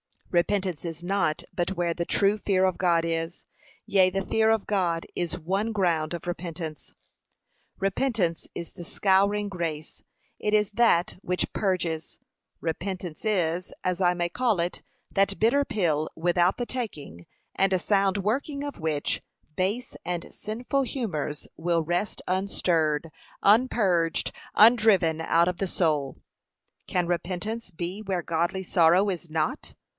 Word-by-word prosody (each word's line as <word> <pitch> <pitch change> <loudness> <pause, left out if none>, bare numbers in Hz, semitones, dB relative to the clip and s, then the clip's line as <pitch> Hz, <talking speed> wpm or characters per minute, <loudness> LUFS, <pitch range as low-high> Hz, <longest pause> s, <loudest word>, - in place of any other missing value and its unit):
Repentance 185 -1 +1
is 165 0 -5
not 180 -4 0
but 180 0 -1
where 175 -2 0
the 170 0 -2
true 200 +3 +2
fear 195 -2 +1
of 185 -1 +2
God 170 -2 +3
is; 165 +1 -3 0.4
yea, 190 -2 +4
the 195 +1 -2
fear 220 0 +2
of 225 -2 +2
God 175 -5 0
is 175 0 -2
one 195 +7 -1
ground 170 -5 +1
of 170 - -5
repentance. 170 -3 -6 0.8
Repentance 195 -3 0
is 170 -2 -6
the 175 - -9
scouring 200 +3 +2
grace, 165 -5 -5 0.4
it 210 - -1
is 210 -1 +2
that 205 -7 +3
which 180 -1 -1
purges. 170 -5 -1 0.4
Repentance 175 +1 -4
is, 180 -4 0
as 180 -1 0
I 180 -2 +4
may 175 0 -1
call 225 -3 +1
it, 175 +1 -3 0.3
that 195 0 +2
bitter 260 +6 +3
pill 155 - 0
without 175 +2 +2
the 245 - -2
taking, 155 - -6 0.3
and 190 -1 +2
sound 195 +1 +2
working 275 +8 -1
of 285 -1 -6
which, 155 -3 -1 0.4
base 205 +7 -1
and 175 -1 -4
sinful 245 +6 -2
humours 180 - -3
will 165 0 +1
rest 175 +6 -1
unstirred, 165 -5 +1 0.3
unpurged, 200 -7 +3 0.2
undriven 210 -8 +5
out 170 +2 +3
of 180 - -4
the 195 - -1
soul. 150 -7 0 0.7
Can 180 -1 +1
repentance 185 +6 -3
be 180 +3 -5
where 190 -4 -2
godly 170 +4 -1
sorrow 175 +3 +4
is 175 -3 -4
not? 155 -1 -2
180 Hz, 140 wpm, -27 LUFS, 170-205 Hz, 0.8 s, undriven